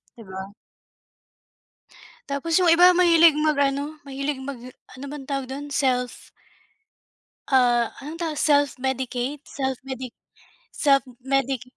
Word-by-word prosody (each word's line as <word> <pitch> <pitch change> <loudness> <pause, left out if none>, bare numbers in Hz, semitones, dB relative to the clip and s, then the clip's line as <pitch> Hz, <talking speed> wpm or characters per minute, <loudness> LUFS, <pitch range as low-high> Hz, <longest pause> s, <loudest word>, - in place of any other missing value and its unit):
'Di 230 - -12
ba? 190 0 -8 1.8
Tapos 280 +4 -3
yung 360 - +3
iba 355 +2 +7
mahilig 335 -3 +5
mag 305 -1 +2 0.2
ano 280 +1 -3 0.2
mahilig 275 0 -3
mag 275 -3 -6 0.4
ano 260 +2 -8
bang 285 -3 -8
tawag 275 -2 -2
dun 275 +2 -6
self 250 -3 +1 1.4
Ah, 240 -3 +2
anong 320 +4 -8
ta 320 -3 -3
self-medicate, 265 -2 0
self-medi 265 -1 -5 0.6
self-medicate 265 -2 0
275 Hz, 105 wpm, -24 LUFS, 255-290 Hz, 1.8 s, iba